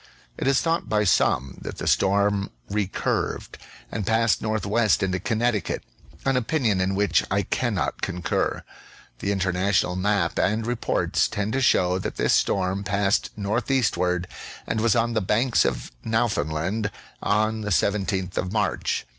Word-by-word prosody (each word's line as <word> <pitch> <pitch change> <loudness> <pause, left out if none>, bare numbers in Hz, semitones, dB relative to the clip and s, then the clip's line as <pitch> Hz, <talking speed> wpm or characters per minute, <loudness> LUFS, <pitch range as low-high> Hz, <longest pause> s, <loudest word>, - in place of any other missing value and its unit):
It - - -3
is 140 -1 +3
thought 165 0 -1
by 105 -1 +2
some 70 -8 +1
that - - -7
the - - -5
storm 100 0 +2 0.2
re 105 -1 0
curved - - -2 0.3
and 105 - -3
passed 115 +2 +2
northwest 110 0 +1
into 95 -1 0
Connecticut; 115 -1 -1 0.4
an 135 -1 +2
opinion 115 -6 +1
in 95 +1 0
which 100 +1 +2
I - - +1
cannot - - -1
concur. 90 -2 -1 0.6
The 100 - -1
international 95 -1 +1
map 95 -2 0
and 110 +1 +1
reports 120 0 0
tend 105 +2 -3
to 135 - +1
show 90 -7 +3
that - - -4
this - - +2
storm 95 +1 +1
passed 100 0 +1
northeastward 105 -5 0 0.4
and 110 - -1
was 115 -2 +3
on 115 0 +1
the 110 - +1
Banks 115 +6 +2
of - - -2
Nowfoundland 105 -3 0 0.3
on 110 +1 +1
the 105 - -3
17th 95 -1 0
of 90 - -1
March. 105 -1 -1
105 Hz, 145 wpm, -24 LUFS, 95-115 Hz, 0.6 s, is